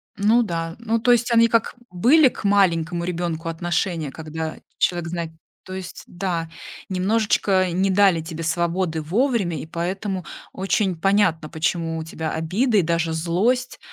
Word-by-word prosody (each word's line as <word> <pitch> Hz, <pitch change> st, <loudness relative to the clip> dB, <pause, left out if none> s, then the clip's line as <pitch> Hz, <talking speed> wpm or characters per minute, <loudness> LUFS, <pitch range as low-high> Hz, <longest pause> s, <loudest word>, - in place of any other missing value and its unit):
Ну 215 Hz, +4 st, +3 dB
да, 165 Hz, -4 st, -3 dB
ну, 230 Hz, 0 st, 0 dB
то 245 Hz, +2 st, +3 dB
есть 240 Hz, 0 st, +3 dB
они 230 Hz, 0 st, +6 dB
как 230 Hz, 0 st, +1 dB, 0.2 s
были 260 Hz, -, +5 dB
к -, -, -10 dB
маленькому 175 Hz, -4 st, +2 dB
ребенку 170 Hz, -2 st, -3 dB
отношения, 165 Hz, -2 st, -2 dB
когда 160 Hz, +1 st, -5 dB, 0.2 s
человек 175 Hz, -2 st, 0 dB
знает, 170 Hz, -1 st, -4 dB, 0.3 s
то 185 Hz, -, -9 dB
есть, 185 Hz, -2 st, -7 dB
да, 175 Hz, -3 st, -3 dB, 0.4 s
немножечко 190 Hz, -1 st, +1 dB
не 190 Hz, +3 st, +1 dB
дали 190 Hz, -3 st, +4 dB
тебе 165 Hz, 0 st, -6 dB
свободы 170 Hz, 0 st, -1 dB
вовремя, 195 Hz, -, 0 dB
и -, -, -6 dB
поэтому 185 Hz, +3 st, -3 dB, 0.3 s
очень 190 Hz, 0 st, 0 dB
понятно, 195 Hz, -5 st, +2 dB
почему 165 Hz, 0 st, -1 dB
у 160 Hz, -, -4 dB
тебя 160 Hz, 0 st, -5 dB
обида 210 Hz, +9 st, +1 dB
и -, -, +6 dB
даже 165 Hz, 0 st, 0 dB
злость. 195 Hz, +11 st, 0 dB
175 Hz, 150 wpm, -22 LUFS, 165-205 Hz, 0.4 s, они